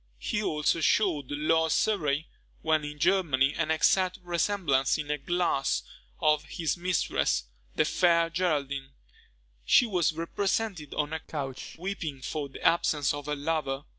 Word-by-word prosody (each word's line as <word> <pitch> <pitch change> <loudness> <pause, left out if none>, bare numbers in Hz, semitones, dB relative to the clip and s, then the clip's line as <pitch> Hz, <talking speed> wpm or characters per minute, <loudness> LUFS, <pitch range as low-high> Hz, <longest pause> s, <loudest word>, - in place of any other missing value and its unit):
He 210 - -2
also 155 -3 0
shewed 160 -7 +2
Lord 160 +2 +1
Surrey, 160 -7 +1 0.4
when 155 -1 +2
in 150 0 -6
Germany, 150 -6 +2
an 165 -1 -1
exact 180 +3 +2
resemblance 170 -6 +1
in 150 -1 -4
a 150 - -1
glass 175 -3 0 0.4
of 150 -1 +3
his 160 +1 -2
mistress, 175 - 0 0.3
the - - +3
fair 170 -2 +3
Geraldine. 140 -6 -1 0.7
She 245 - +5
was 180 -8 +1
represented 180 0 -2
on 150 +1 -1
a 160 - -2
couch 140 -4 -6
weeping 160 -7 -5
for 145 0 -4
the - - -11
absence 150 -4 +2
of 145 0 -6
her 150 - -1
lover. 145 -2 -2
155 Hz, 140 wpm, -28 LUFS, 145-175 Hz, 0.7 s, She